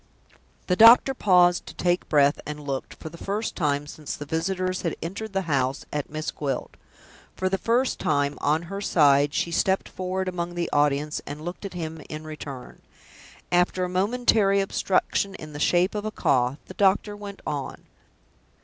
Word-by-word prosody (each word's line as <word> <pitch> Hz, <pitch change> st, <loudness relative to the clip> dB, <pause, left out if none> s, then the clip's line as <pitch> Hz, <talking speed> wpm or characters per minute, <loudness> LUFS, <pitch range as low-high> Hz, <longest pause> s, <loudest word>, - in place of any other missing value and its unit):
The 180 Hz, -, +1 dB
doctor 230 Hz, +6 st, +8 dB
paused 180 Hz, -6 st, +3 dB
to -, -, -9 dB
take 175 Hz, 0 st, 0 dB
breath 145 Hz, -1 st, +4 dB
and 150 Hz, 0 st, -5 dB
looked, 140 Hz, -2 st, -5 dB
for 160 Hz, -, -8 dB
the 170 Hz, +1 st, -13 dB
first 205 Hz, +3 st, -3 dB
time 145 Hz, -3 st, 0 dB
since 150 Hz, 0 st, -7 dB
the 145 Hz, -, -7 dB
visitors 185 Hz, +4 st, -1 dB
had 170 Hz, -, -2 dB
entered 200 Hz, +6 st, -5 dB
the 195 Hz, 0 st, 0 dB
house, 135 Hz, -4 st, -1 dB
at 150 Hz, -1 st, -3 dB
Miss 155 Hz, +1 st, -4 dB
Gwilt. 135 Hz, -4 st, -4 dB, 0.6 s
For 185 Hz, -, -1 dB
the 195 Hz, 0 st, -1 dB
first 240 Hz, +6 st, +1 dB
time, 145 Hz, -1 st, +1 dB
on 155 Hz, +3 st, +1 dB
her 195 Hz, +4 st, -6 dB
side, 145 Hz, -6 st, +4 dB
she 170 Hz, -, -1 dB
stepped 190 Hz, +3 st, +1 dB
forward 185 Hz, 0 st, -3 dB
among 175 Hz, -1 st, -3 dB
the 175 Hz, -1 st, -2 dB
audience, 145 Hz, +1 st, +1 dB
and 150 Hz, +2 st, -7 dB
looked 175 Hz, +3 st, -6 dB
at 190 Hz, -, -7 dB
him 160 Hz, -2 st, -5 dB
in 155 Hz, 0 st, -6 dB
return. 145 Hz, -4 st, -9 dB, 0.7 s
After 180 Hz, +1 st, +2 dB
a 180 Hz, -, -1 dB
momentary 200 Hz, +1 st, +2 dB
obstruction 195 Hz, 0 st, 0 dB
in 155 Hz, -4 st, -10 dB
the 145 Hz, -, -6 dB
shape 175 Hz, +4 st, +2 dB
of 210 Hz, -1 st, -3 dB
a -, -, -1 dB
cough, 130 Hz, -9 st, +1 dB
the -, -, -10 dB
doctor 200 Hz, +2 st, +2 dB
went 205 Hz, -1 st, -9 dB
on. 145 Hz, -2 st, -4 dB
175 Hz, 175 wpm, -25 LUFS, 150-195 Hz, 0.7 s, doctor